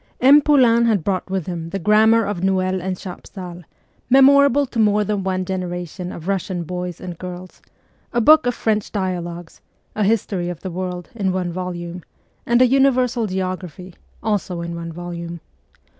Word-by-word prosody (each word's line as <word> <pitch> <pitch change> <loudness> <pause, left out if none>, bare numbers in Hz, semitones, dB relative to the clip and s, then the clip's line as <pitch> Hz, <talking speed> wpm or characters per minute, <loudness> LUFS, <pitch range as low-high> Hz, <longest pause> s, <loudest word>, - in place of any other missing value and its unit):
M. 280 +4 +7
Poulain 250 -6 +4
had 215 -7 +2
brought 190 0 -2
with 190 -4 -2
him 170 -2 -5
the 195 - -3
grammar 220 +4 +4
of 195 -3 -3
Noel 185 -1 +1
and 185 0 -3
Chapsal, 180 -1 -9 0.5
memorable 280 +1 +6
to 245 -3 -5
more 210 -1 +3
than 205 -1 -2
one 185 -1 -1
generation 180 -1 -4
of 170 +1 -9
Russian 190 -2 -2
boys 180 +1 -5
and 175 -2 -8
girls; 180 0 -9 0.5
a 240 - +1
book 305 +4 +6
of 245 - 0
French 215 -2 -1
dialogues; 175 -4 -4 0.3
a 215 - 0
history 195 -4 0
of 175 -2 -7
the 190 - -5
world, 180 -1 -5
in 200 -5 -1
one 180 -1 -2
volume; 175 -1 -5 0.5
and 240 +1 +5
a - - +5
universal 255 -3 +2
geography, 185 -2 -5 0.3
also 195 -5 -1
in 170 0 -5
one 170 0 -6
volume. 170 0 -7
185 Hz, 165 wpm, -20 LUFS, 175-220 Hz, 0.5 s, M